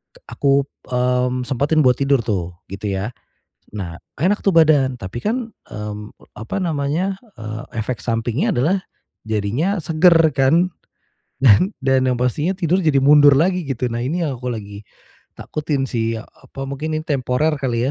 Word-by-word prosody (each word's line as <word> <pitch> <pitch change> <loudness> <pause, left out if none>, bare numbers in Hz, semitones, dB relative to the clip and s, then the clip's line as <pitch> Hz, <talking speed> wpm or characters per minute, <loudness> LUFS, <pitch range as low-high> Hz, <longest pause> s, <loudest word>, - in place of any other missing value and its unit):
Ek - - -19 0.2
aku, 140 0 +3 0.3
mmm, 125 0 +1
sempetin 140 +4 +1
buat 125 -1 +4
tidur 140 -2 +2
tuh, 90 -6 -2 0.2
gitu 100 +2 -5
ya. 100 +5 -3 0.6
Nah, 90 -5 -5 0.2
enak 190 - +1
tuh 195 - +4
badan. 150 -5 +4
Tapi 115 +2 -6
kan, 230 +1 -2 0.2
mmm, 105 0 -6 0.2
apa 110 - -5
namanya? 165 +2 -1 0.2
Eee, 110 +1 -6 0.2
efek 110 +1 -3
sampingnya 120 - -1
adalah 175 +5 +1 0.4
jadinya 110 - -1
seger 165 +1 +4 0.2
kan? 160 +7 +3 0.7
Dan 135 - +5
dan 130 -1 +3
yang 125 - +1
pastinya 145 +8 0
tidur 180 +1 +1
jadi 155 -4 +3
mundur 145 +1 +7
lagi, 180 +3 +2
gitu. 130 -2 -1
Nah, 115 - -2
ini 155 +8 -1
yang 135 -3 -3
aku 125 +1 -4
lagi 100 -3 -7 0.6
takutin 145 -3 -2
sih 115 -1 -1
ya - - -13
apa 135 - -10
mungkin 145 +3 -4
nih 155 - -3
temporer 140 +2 +1
kali 125 -3 -1
135 Hz, 160 wpm, -20 LUFS, 115-155 Hz, 0.7 s, mundur